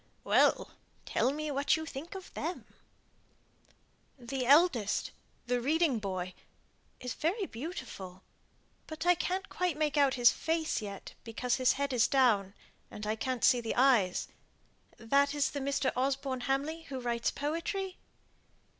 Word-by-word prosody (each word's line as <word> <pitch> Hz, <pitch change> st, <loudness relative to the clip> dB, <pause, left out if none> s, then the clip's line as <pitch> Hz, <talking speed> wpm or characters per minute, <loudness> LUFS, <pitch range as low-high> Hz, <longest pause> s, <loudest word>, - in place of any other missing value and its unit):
"Well! -, -, +3 dB, 0.3 s
tell 255 Hz, -, +1 dB
me 305 Hz, +1 st, -3 dB
what 280 Hz, +3 st, +2 dB
you 315 Hz, -, -5 dB
think 315 Hz, +5 st, -7 dB
of 380 Hz, -, -9 dB
them!" 335 Hz, +4 st, -4 dB, 1.5 s
"The 255 Hz, 0 st, -4 dB
eldest 280 Hz, -, +4 dB, 0.3 s
the 245 Hz, 0 st, 0 dB
reading 300 Hz, -1 st, +2 dB
boy 185 Hz, -3 st, -4 dB, 0.7 s
is 250 Hz, -2 st, -4 dB
very 380 Hz, +6 st, -1 dB
beautiful; 230 Hz, -, -7 dB, 0.6 s
but 315 Hz, +1 st, -6 dB
I 355 Hz, -, +7 dB
can't 370 Hz, +2 st, -2 dB
quite 360 Hz, -4 st, -1 dB
make 300 Hz, -1 st, 0 dB
out 280 Hz, -2 st, +4 dB
his 245 Hz, -2 st, +6 dB
face 320 Hz, -4 st, -1 dB
yet, 200 Hz, -2 st, -7 dB
because 240 Hz, +2 st, -1 dB
his 255 Hz, -1 st, +4 dB
head 280 Hz, -1 st, -2 dB
is 245 Hz, -2 st, +4 dB
down, 220 Hz, -7 st, +3 dB, 0.3 s
and 210 Hz, -, -7 dB
I 215 Hz, +1 st, 0 dB
can't 255 Hz, +1 st, -3 dB
see 245 Hz, -, +5 dB
the 225 Hz, -, -3 dB
eyes. 240 Hz, -9 st, +3 dB, 0.7 s
That 280 Hz, +5 st, +2 dB
is 285 Hz, -2 st, +1 dB
the 285 Hz, -, -4 dB
Mr. 275 Hz, 0 st, 0 dB
Osborne 265 Hz, 0 st, -1 dB
Hamley 290 Hz, +5 st, -1 dB
who 265 Hz, -2 st, -4 dB
writes 235 Hz, -1 st, -1 dB
poetry." 365 Hz, +6 st, -3 dB
270 Hz, 145 wpm, -31 LUFS, 240-315 Hz, 1.5 s, I